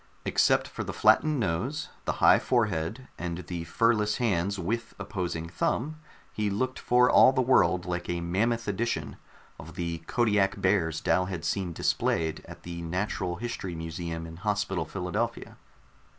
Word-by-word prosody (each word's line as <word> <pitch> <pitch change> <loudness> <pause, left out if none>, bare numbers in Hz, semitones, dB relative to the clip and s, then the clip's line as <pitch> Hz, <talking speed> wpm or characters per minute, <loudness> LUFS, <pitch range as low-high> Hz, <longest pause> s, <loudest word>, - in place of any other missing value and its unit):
Except - - +3
for - - -5
the - - -5
flattened 155 -3 +4
nose, 115 - -2 0.2
the - - 0
high - - +7
forehead 110 0 0
and 85 -1 -3
the 85 -1 -5
fur 115 +6 +3
less 105 -1 0
hand 100 -5 0
with 115 +6 -3
opposing 85 -5 -4
thumb, 125 - -1 0.4
he 105 -1 -1
looked 130 +6 -2
for 125 0 +4
all 130 - +7
the 135 - -1
world 90 -8 +3
like 90 -1 -3
a 85 0 -1
mammoth 110 +7 0
edition 100 -7 -2 0.4
of - - -10
the 85 -1 -3
Kodiak 105 -5 +2
bears 90 -5 +1
Dal 90 0 +2
had 90 -3 -5
seen 95 0 -1
displayed 80 -1 0
at - - -11
the 85 0 -6
natural 90 +1 -2
history 95 -4 -5
museum 80 0 -5
in 80 0 -9
Hospital 100 -1 -1
Philadelphia. 90 -2 -3
95 Hz, 155 wpm, -28 LUFS, 85-115 Hz, 0.4 s, high